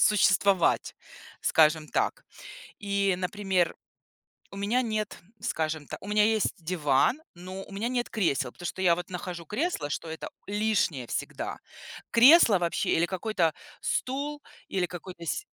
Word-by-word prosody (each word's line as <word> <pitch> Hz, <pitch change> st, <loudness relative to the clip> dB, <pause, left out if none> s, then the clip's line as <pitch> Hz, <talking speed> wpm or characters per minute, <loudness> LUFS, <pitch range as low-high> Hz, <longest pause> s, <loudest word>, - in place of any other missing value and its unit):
существовать, 195 Hz, -2 st, +3 dB, 0.5 s
скажем 155 Hz, -1 st, +3 dB
так. -, -, -1 dB, 0.5 s
И, 200 Hz, -2 st, +1 dB
например, 190 Hz, -2 st, 0 dB, 0.8 s
у 200 Hz, -, -10 dB
меня 215 Hz, +6 st, +1 dB
нет, 215 Hz, -3 st, -2 dB, 0.2 s
скажем 155 Hz, -2 st, -2 dB
та -, -, -6 dB
у -, -, -10 dB
меня 210 Hz, 0 st, +4 dB
есть 220 Hz, -1 st, +2 dB
диван, 160 Hz, -, +2 dB
но 185 Hz, +2 st, -8 dB
у -, -, -15 dB
меня 205 Hz, +4 st, -2 dB
нет 245 Hz, -1 st, -1 dB
кресел, 140 Hz, -, 0 dB
потому 175 Hz, -, -8 dB
что 180 Hz, -, -5 dB
я 175 Hz, -2 st, +5 dB
вот 175 Hz, +1 st, -7 dB
нахожу 180 Hz, -1 st, -5 dB
кресло, 210 Hz, -, -2 dB
что 165 Hz, -, -4 dB
это 160 Hz, 0 st, -6 dB, 0.2 s
лишнее 205 Hz, -, 0 dB
всегда. -, -, -4 dB, 0.5 s
Кресло 240 Hz, -, +7 dB
вообще, 170 Hz, -1 st, -1 dB
или 170 Hz, +1 st, +3 dB
какой-то 185 Hz, -4 st, 0 dB, 0.3 s
стул, 285 Hz, +3 st, -2 dB, 0.3 s
или 185 Hz, -2 st, 0 dB
какой-то 175 Hz, 0 st, -9 dB
си 345 Hz, -, -2 dB
190 Hz, 140 wpm, -28 LUFS, 170-215 Hz, 0.8 s, Кресло